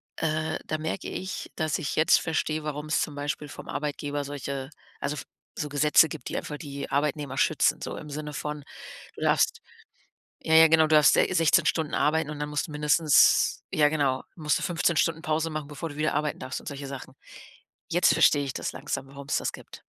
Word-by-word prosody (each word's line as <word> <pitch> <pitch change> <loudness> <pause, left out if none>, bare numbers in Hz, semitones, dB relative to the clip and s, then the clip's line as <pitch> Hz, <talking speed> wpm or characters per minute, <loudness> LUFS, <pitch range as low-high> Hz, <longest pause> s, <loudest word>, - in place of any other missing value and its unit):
Äh, 155 0 -1
da 155 - -2
merke 160 +4 -4
ich, 190 0 -5
dass 155 -2 0
ich 155 -5 -4
jetzt 155 - +5
verstehe, 155 -1 -1
warum 150 0 -4
es 155 - +1
zum 150 - -3
Beispiel 145 +1 -4
vom - - -10
Arbeitgeber 145 0 -3
solche 140 -1 -5 0.3
also, 145 - -2
f 145 - -6 0.4
so 150 - -2
Gesetze 150 +2 +5
gibt, 130 - -7
die - - -3
einfach 150 - -5
die 140 -2 -7
Arbeitnehmer 140 -1 -1
schützen, 155 +1 +2
so - - -5
im 150 - -9
Sinne 150 +1 -5
von, 150 0 -5 0.5
du - - -11
darfst - - +2 0.8
ja, 160 - 0
ja 160 0 +9
genau, 160 0 +5
du 155 - +4
darfst 150 -2 +6
se - - +4
16 165 -1 +4
Stunden 160 -3 0
arbeiten 150 +1 +1
und 150 - -7
dann 150 0 -3
musst 150 +1 -2
du - - -10
mindestens 150 0 +4
ja 150 -1 +5
genau, 140 -4 0
musst 150 -3 0
du - - -5
15 170 -2 +1
Stunden 165 -1 +1
Pause 160 -1 -1
machen, 155 -2 -5
bevor 150 +3 -5
du 145 - -10
wieder 155 -1 0
arbeiten 150 -1 -1
darfst 130 0 -5
und - - -13
solche 140 -1 -6
Sachen. 135 -3 -8 0.8
Jetzt - - +4
verstehe 145 - +4
ich 135 - -4
das - - -3
langsam, 135 -1 -4
warum's 140 +1 -3
das - - -1
gibt. - - -12
150 Hz, 205 wpm, -27 LUFS, 145-155 Hz, 0.8 s, ja